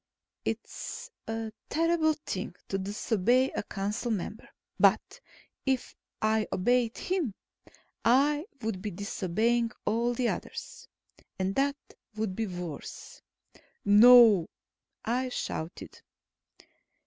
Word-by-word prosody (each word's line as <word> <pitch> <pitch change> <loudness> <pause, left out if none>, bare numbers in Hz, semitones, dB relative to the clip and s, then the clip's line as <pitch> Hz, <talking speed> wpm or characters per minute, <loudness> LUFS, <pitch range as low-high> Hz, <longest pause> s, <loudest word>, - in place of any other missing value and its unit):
It's 475 +2 -5 0.2
a 225 0 -3 0.2
terrible 320 -1 +2
thing 185 -2 -4
to 195 - -1
disobey 220 +5 +1
a - - -2
council 205 +4 -3
member. 215 0 -4 0.3
But - - +3 0.4
if 265 -2 -1 0.2
I 215 -1 +1
obeyed 240 +4 +1
him, 345 - -1 0.7
I 290 +6 +3 0.2
would 215 -4 -2
be 210 - -3
disobeying 215 +4 0 0.2
all 235 +2 +1
the 245 0 +1
others. 480 0 -6 0.5
And 190 +1 -1
that 280 +3 +1 0.4
would 215 -3 -2
be 225 +1 -1
worse. 175 -5 -7 0.6
"No!" 215 -3 +8 0.6
I 255 +3 0
shouted. 165 -8 -5
225 Hz, 100 wpm, -29 LUFS, 200-255 Hz, 0.7 s, No